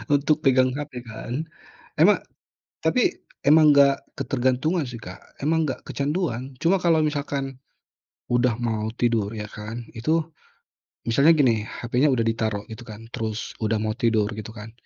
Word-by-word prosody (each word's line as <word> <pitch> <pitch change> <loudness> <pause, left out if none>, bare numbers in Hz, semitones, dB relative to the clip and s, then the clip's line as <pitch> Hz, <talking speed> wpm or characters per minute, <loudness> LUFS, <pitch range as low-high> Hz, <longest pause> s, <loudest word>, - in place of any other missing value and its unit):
untuk 150 +2 +1
pegang 130 -1 +4
HP 130 -5 -6
kan. 125 +7 -5 0.5
Emang - - +5 0.6
tapi - - +1 0.2
emang 150 0 +6
nggak 140 -1 +3
ketergantungan 135 +4 0
sih 120 - -7
Kak, 95 -5 -9 0.2
emang 160 +1 +2
nggak 130 - -4
kecanduan. 140 -4 -2
Cuma 185 +3 +4
kalo 165 -3 +3
misalkan 140 -3 -2 0.7
udah 120 -2 +2
mau 110 -2 -1
tidur 115 -4 +1
ya 105 -1 -5
kan 110 +3 -7
itu, 155 +8 0 0.8
misalnya 140 +8 +5
gini 120 -7 +3
HP-nya 125 +5 0
udah 120 -4 +2
ditaruh 110 -2 -1
gitu 120 +2 -10
kan, 110 +1 -9
terus 110 -1 -4
udah 110 0 +1
mau 110 0 -1
tidur 110 -3 +1
gitu 110 +1 -7
kan, 105 +2 -9
125 Hz, 145 wpm, -24 LUFS, 110-145 Hz, 0.8 s, emang